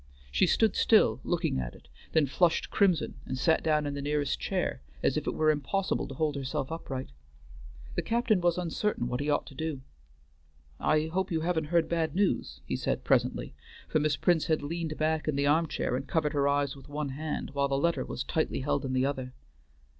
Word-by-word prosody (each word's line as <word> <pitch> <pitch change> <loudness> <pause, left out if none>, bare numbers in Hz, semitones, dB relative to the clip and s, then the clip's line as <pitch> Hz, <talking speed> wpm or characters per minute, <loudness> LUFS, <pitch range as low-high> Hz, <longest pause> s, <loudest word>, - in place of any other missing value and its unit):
She 185 - +3
stood 220 +3 +3
still, 130 - +4
looking 170 - 0
at - - -4
it, 70 - -17 0.3
then 160 -2 +4
flushed 165 +5 +1
crimson, 185 -6 +2
and 130 - -3
sat 160 +5 +3
down 150 -2 +2
in 145 - -2
the 140 - -4
nearest 145 -1 0
chair, - - -1 0.2
as - - +2
if - - -2
it - - -1
were 155 0 +4
impossible 155 +7 -1
to 135 - -8
hold 155 +1 0
herself 135 +1 -3
upright. 135 - -5 0.8
The - - 0
captain 225 -4 +1
was 175 0 +2
uncertain 180 - -1
what 125 0 -2
he 145 +1 -1
ought 145 - +1
to - - -11
do. 155 -1 -3 1.0
"I 155 0 +2
hope 185 +4 -1
you 165 -3 0
haven't 165 -2 0
heard 165 +1 +2
bad 165 -2 -1
news," 200 0 0
he - - -2
said - - -1
presently, - - +1 0.3
for 155 - +1
Miss 150 -1 +1
Prince 170 -3 +2
had 155 -3 +1
leaned 160 +1 -3
back 155 -1 0
in 155 - +1
the 140 0 +1
arm 160 +3 +3
chair 125 - -1
and 135 +2 -4
covered 155 -2 0
her 140 -1 +2
eyes 140 -1 +1
with 135 - -14
one 145 0 -3
hand, 150 +2 -4
while 140 0 +1
the 135 0 0
letter 170 +4 +1
was 130 - -4
tightly 155 0 -1
held 145 - 0
in 130 -1 -2
the 130 0 +2
other. 130 -2 -3
150 Hz, 210 wpm, -29 LUFS, 140-165 Hz, 1.0 s, still